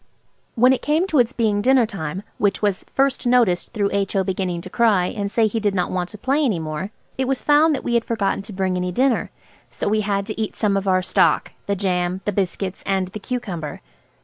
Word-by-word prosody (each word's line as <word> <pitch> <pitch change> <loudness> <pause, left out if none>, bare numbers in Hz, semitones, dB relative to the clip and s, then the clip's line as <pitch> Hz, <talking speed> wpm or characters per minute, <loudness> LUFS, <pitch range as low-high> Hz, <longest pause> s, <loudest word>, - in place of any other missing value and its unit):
When 250 +2 +5
it 260 - -2
came 310 +4 +1
to 300 - +3
its 240 0 +3
being 215 -5 +1
dinner 255 +1 +4
time, 190 -4 -5 0.2
which 205 0 +1
was 200 -3 0
first 270 -2 +1
noticed 235 -8 +2
through 205 -3 0
H.O. 195 -1 0
beginning 185 -2 -2
to - - -9
cry 215 -6 +3
and 200 +1 -3
say 225 0 +3
he 220 +1 0
did 205 -2 0
not 180 -2 0
want 180 -1 -2
to 210 - -9
play 275 +7 +1
any 225 -10 +1
more, 155 +3 -4 0.3
it 265 - +1
was 270 -1 0
found 300 +1 +4
that - - -5
we 240 - -2
had 235 -1 +3
forgotten 210 -4 -1
to 205 +2 -11
bring 190 -1 -1
any 180 0 -2
dinner. 255 +6 +1 0.4
So - - -4
we 215 +1 +2
had 200 -1 -1
to 215 +1 -4
eat 215 - -3
some 205 -3 +1
of 195 0 -1
our 185 -1 +3
stock–the 200 +2 +1
jam, 180 -1 -1
the 205 - +1
biscuits, 190 -1 -2
and 190 -2 0
the 215 - -7
cucumber. 195 - -4
205 Hz, 225 wpm, -21 LUFS, 185-235 Hz, 0.4 s, When